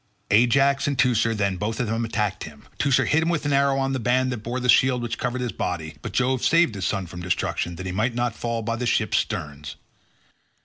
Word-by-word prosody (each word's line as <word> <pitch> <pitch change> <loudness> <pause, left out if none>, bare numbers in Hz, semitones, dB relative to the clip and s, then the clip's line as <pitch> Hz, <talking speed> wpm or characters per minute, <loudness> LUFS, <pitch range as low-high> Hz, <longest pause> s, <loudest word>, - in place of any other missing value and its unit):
Ajax 135 +6 +3
and 140 -2 -1
Teucer 115 -2 +2
then 100 -3 0
both 110 +3 -3
of 125 - 0
them 115 +1 -1
attacked 105 -3 -2
him. 75 -2 -13
Teucer 140 -2 +3
hit 160 - +2
him 165 - 0
with 170 -4 -1
an 145 - +1
arrow 140 0 +3
on 135 0 0
the 130 - -1
band 130 +2 +1
that 125 - -3
bore 120 +4 -4
the 125 - -2
shield 125 0 +4
which 115 -1 -4
covered 125 0 -2
his 125 -2 -2
body, 80 -3 -4
but - - -6
Jove 130 0 0
saved 165 -7 +4
his 95 -2 -2
son 100 -3 -2
from 85 +1 -9
destruction 85 0 -2
that 95 - -7
he 95 - -3
might 110 +6 -1
not 120 -1 0
fall 115 0 -3
by 115 +1 -2
the 125 +1 -2
ships' - - +2
sterns. 75 0 -5
120 Hz, 235 wpm, -24 LUFS, 100-130 Hz, -, shield